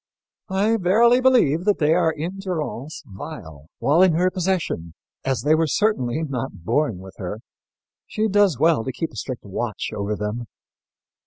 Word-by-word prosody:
I 205 +4 +2
verily 230 +6 +4
believe 235 - +4
that 205 -1 +3
they 155 0 +3
are 170 -1 +3
in 165 +5 -5
durance 155 -6 -4
vile 80 - -9
while 155 +5 +3
in 185 -3 +5
her 180 +3 +2
possession, 175 - -2 0.3
as 130 -4 -1
they 150 - +4
were 160 0 +3
certainly 155 - 0
not 130 - -5
born 145 -4 +1
with 95 +1 -11
her. 100 +4 -5 0.7
She 220 0 0
does 205 - +3
well 155 -3 +3
to 130 - -3
keep 160 +6 -4
a - - -15
strict 130 -5 -5
watch 110 +3 -4
over 100 +1 -2
them." 105 +3 -4
155 Hz, 165 wpm, -22 LUFS, 115-185 Hz, 0.7 s, in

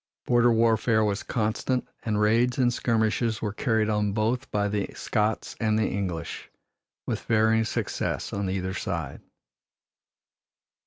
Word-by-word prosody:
Border 120 0 +4
warfare 115 -1 +3
was 100 -1 -1
constant 120 +3 -1
and 105 -2 -1
raids 115 +4 +3
and 125 -2 +3
skirmishes 110 -1 +1
were 105 -2 -3
carried 110 -2 +1
on 105 -2 0
both 115 +4 0
by 105 -1 0
the 100 -1 -2
Scots 110 -1 -1
and 110 -1 +1
the 110 - +2
English, 90 -5 -4 0.6
with - - -2
varying 110 0 +3
success - - -2
on 100 -1 -2
either 95 0 -2
side. 85 -7 -4
110 Hz, 135 wpm, -26 LUFS, 105-115 Hz, 0.6 s, Border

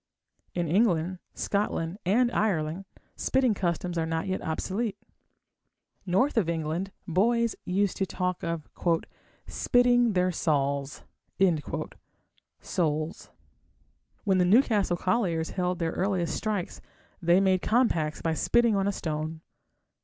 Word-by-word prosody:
In 175 -2 0
England, 180 -1 +2 0.2
Scotland, 200 -3 -1
and 240 +5 +3
Ireland 180 -4 0 0.3
spitting 260 -4 +2
customs 175 -2 -2
are 160 - 0
not 160 0 -1
yet 190 -1 -2
obsolete. 195 +6 -2 1.1
North 195 +10 +2
of 190 -7 +2
England 165 +4 -2 0.2
boys 230 +6 +2
used 195 +1 0
to 195 - 0
talk 180 -1 -2
of 165 -3 -3 0.8
"spitting 245 -2 +3
their 180 0 +2
sauls" 140 -4 -1 1.6
(souls). 155 -1 -2 0.9
When 190 -3 +2
the - - +5
Newcastle 205 -3 +3
colliers 180 -5 0
held 180 -1 -1
their 165 -2 -1
earliest 185 -2 -1
strikes 210 -5 -3 0.4
they 175 +1 +4
made 190 -2 +3
compacts 175 -11 +1
by 165 - +1
spitting 235 +6 +3
on 195 0 +1
a - - +2
stone. 155 -3 -4
185 Hz, 115 wpm, -27 LUFS, 165-205 Hz, 1.6 s, the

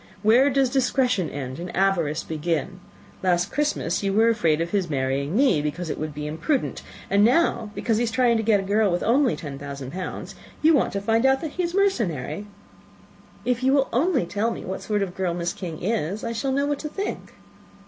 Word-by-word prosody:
Where 240 +6 +5
does 270 -2 +2
discretion 250 - +1
end, 130 -1 -6
and 175 +1 -5
avarice 170 -5 +1
begin? 165 +3 -2 0.4
Last 180 0 +1
Christmas 295 - 0
you 195 -1 0
were 225 +3 +4
afraid 165 -9 +2
of 170 +1 -2
his 195 -5 0
marrying 140 +3 -1
me, 255 - +4
because 155 +2 -3
it - - -5
would 155 0 -3
be 150 0 -5
imprudent; 160 - -1 0.3
and 200 +1 +3
now, 245 -2 +2
because 225 -3 0
he 235 - +1
is - - -1
trying 235 0 +3
to - - 0
get 215 -2 +3
a - - -3
girl 205 +1 +2
with 175 - -1
only 255 +2 +3
ten 140 -4 -7
thousand 140 -2 -7
pounds, 185 +3 -6 0.3
you 320 +1 +6
want 290 - +2
to 200 - -2
find 225 +3 +2
out 265 0 +4
that 315 - -4
he 365 - -3
is 345 0 -2
mercenary." 205 - 0 1.0
"If 250 0 0
you 265 +1 +3
will 275 -1 +2
only 270 - +2
tell 205 +6 -1
me - - -6
what 190 - -4
sort 210 -2 0
of 185 -2 -5
girl 180 -3 -1
Miss 175 0 -2
King 170 -4 -7
is, 205 -1 -1
I 230 - -2
shall 265 +4 -1
know 280 +2 +1
what 290 -1 -1
to 305 - -5
think." 400 +6 -5
205 Hz, 215 wpm, -24 LUFS, 170-255 Hz, 1.0 s, you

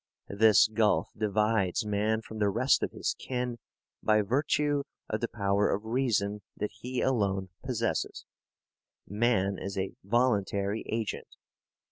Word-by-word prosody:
This 110 +1 +6
gulf 110 -1 +1
divides 105 -2 +1
man 105 +2 0
from 110 0 -8
the 105 -1 +3
rest 125 +6 +3
of - - 0
his - - -2
kin 125 -2 -3 0.4
by 110 -1 +3
virtue 145 +5 +1 0.3
of 110 - -2
the 120 - 0
power 100 -2 +1
of 105 +2 -2
reason 110 -4 0 0.2
that 105 - -2
he 125 +4 -4
alone 100 -7 0
possesses. - - -2 0.8
Man 100 -2 +1
is 100 0 -5
a 95 0 -2
voluntary 100 -2 +1
agent. 110 -1 -3
110 Hz, 130 wpm, -29 LUFS, 100-120 Hz, 0.8 s, This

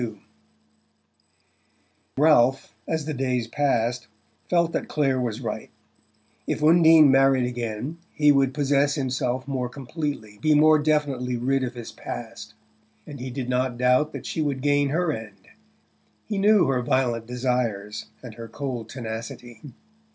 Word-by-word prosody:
XXXII 110 -4 -5 2.0
Ralph, 135 -5 +3
as 160 -2 -2
the 155 - -3
days 125 -3 -1
passed, 120 -3 0 0.4
felt 170 -1 +2
that - - -3
Clare 135 -4 0
was 120 -3 -3
right: - - -5 0.8
if - - -2
Undine 160 -2 +7
married 135 -1 +4
again 120 +5 -4
he 150 -1 +4
would 135 -2 +3
possess 145 0 +1
himself 130 -2 -2
more 130 -3 -2
completely, 135 -6 -6
be 155 +6 +3
more 155 +1 +5
definitely 145 -5 0
rid 135 +3 0
of 125 0 -4
his 120 -2 -8
past. 110 -2 -8 0.5
And 145 -3 -9
he 130 +1 -5
did 130 0 -5
not 125 -1 -1
doubt 125 +5 +2
that - - -7
she 160 - -3
would 140 -3 -2
gain 145 0 +2
her 165 +3 0
end: 105 -5 -10 0.8
he 205 -2 -3
knew 205 0 +5
her 130 -2 +1
violent 120 -2 0
desires 120 -4 -2 0.2
and 120 -3 -9
her 115 +1 -9
cold 120 -2 -5
tenacity. 115 -1 -7
130 Hz, 145 wpm, -24 LUFS, 120-145 Hz, 2.0 s, Undine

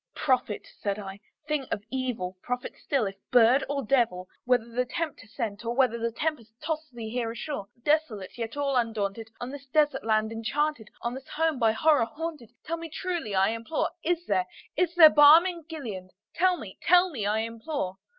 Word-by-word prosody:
"Prophet!" 255 -7 0
said 200 -1 -1
I, 195 -1 -7 0.3
"thing 300 -3 -1
of 205 - -4
evil! 245 -9 -2
prophet 250 0 -4
still, 270 -6 0
if 195 0 -5
bird 245 +3 +5
or 280 -3 -2
devil! 210 -8 +1 0.2
Whether 245 0 +1
Tempter 290 -2 -4
sent, 220 -2 -4
or 235 +1 -2
whether 235 -3 +2
tempest 235 -3 -3
tossed 315 -2 -4
thee 225 -2 -6
here 240 -1 -1
ashore, 235 -3 -5 0.2
Desolate, 295 -11 0
yet 230 +2 -5
all 280 -2 0
undaunted, 225 -2 -1
on 245 +1 -5
this 280 -1 -9
desert 295 -1 +2
land 220 0 +1
enchanted 225 +2 -1
On 235 - -1
this 265 +1 -9
home 320 -3 0
by 225 -2 +4
Horror 295 0 +4
haunted 305 -4 -6 0.2
tell 335 +1 -2
me 330 0 -7
truly, 335 - -3
I 190 +1 +4
implore, 230 +7 -2
Is 350 +1 0
there, 185 -2 +1 0.3
is 355 +1 +1
there 315 -3 +10
balm 300 +4 +8
in 345 -4 -4
Gilead? 220 - -6 0.2
tell 365 +1 +3
me 200 - -10
tell 360 +1 +5
me, 220 -9 -2
I 215 +1 +1
implore!" 225 -3 -4
250 Hz, 180 wpm, -27 LUFS, 220-305 Hz, 0.3 s, there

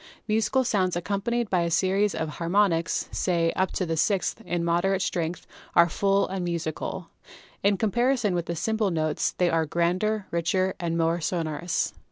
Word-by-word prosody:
Musical 220 +4 +2
sounds 190 -7 +1
accompanied 205 +6 -1
by 185 -3 +1
a 170 - 0
series 190 +4 +2
of 160 - -2
har 165 +2 -5
monics, 175 -4 +2
say 170 -2 +1
up 190 0 +1
to 185 - -1
the 165 -1 -1
sixth, 195 +6 0
in 175 -1 -1
moderate 185 +3 +1
strength 170 -1 -2 0.3
are 170 - +7
full 195 +3 +2
and 190 -1 -3
musical. 170 +1 -4 0.5
In 200 0 +3
comparison 240 0 +1
with 170 -1 -2
simple 220 +1 0
tones 155 -2 -1
they 180 -1 +2
are 160 -1 +1
grander, 185 +6 0
richer 185 +3 +1
and 170 -2 -1
more 165 +1 +1
sonorous. 165 0 -1
180 Hz, 165 wpm, -26 LUFS, 170-200 Hz, 0.5 s, are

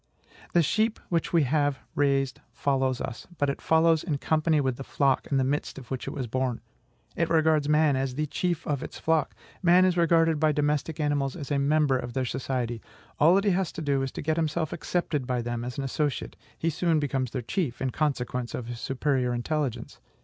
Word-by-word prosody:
"The 170 - +5
sheep 220 +7 +1
which 170 -2 0
we 165 -3 +4
have 145 0 +1 0.2
raised 135 -2 +1
follows 135 -2 0
us, 115 - -6
but 145 -1 +1
it - - -8
follows 160 0 +3
in 155 -5 -1
company 155 +1 +2
with 130 -3 0
the 135 - -6
flock 135 -1 +1
in 140 - 0
the 135 - +3
midst 140 +2 -2
of 130 -2 -11
which 130 - -4
it - - -2
was 135 -3 -3
born. 125 0 -1 0.6
It - - 0
regards 155 -2 +3
man 150 -2 +4
AS 130 -1 -1
THE 155 +2 0
CHIEF 175 +2 -2
OF 140 -3 -1
ITS - - -7
FLOCK.... 160 -2 0 0.3
Man 180 0 +6
is 180 -1 +2
regarded 165 -2 +3
by 155 0 +3
domestic 150 +1 0
animals 145 -3 0
as 150 -4 -7
a 140 - +2
member 140 -2 +2
of 120 -1 -6
their 130 0 0
society. 125 -2 -2 0.4
All 165 +5 +6
that 195 - +3
he 200 - +4
has 185 -2 0
to 165 - -6
do 140 -2 +1
is 135 -1 -2
to - - -5
get 155 +2 0
himself 160 -1 -1
accepted 155 -7 -2
by 125 -2 -1
them 120 0 -3
as 125 0 -5
an 140 - -2
associate: 145 +2 -2 0.2
he 165 - 0
soon 165 0 +1
becomes 135 -3 -1
their 125 0 -4
chief, 140 - -2
in 130 -1 -1
consequence 125 -5 -2
of 125 - -5
his 120 0 -6
superior 130 -1 0
intelligence. 140 0 -3
145 Hz, 215 wpm, -27 LUFS, 130-160 Hz, 0.6 s, Man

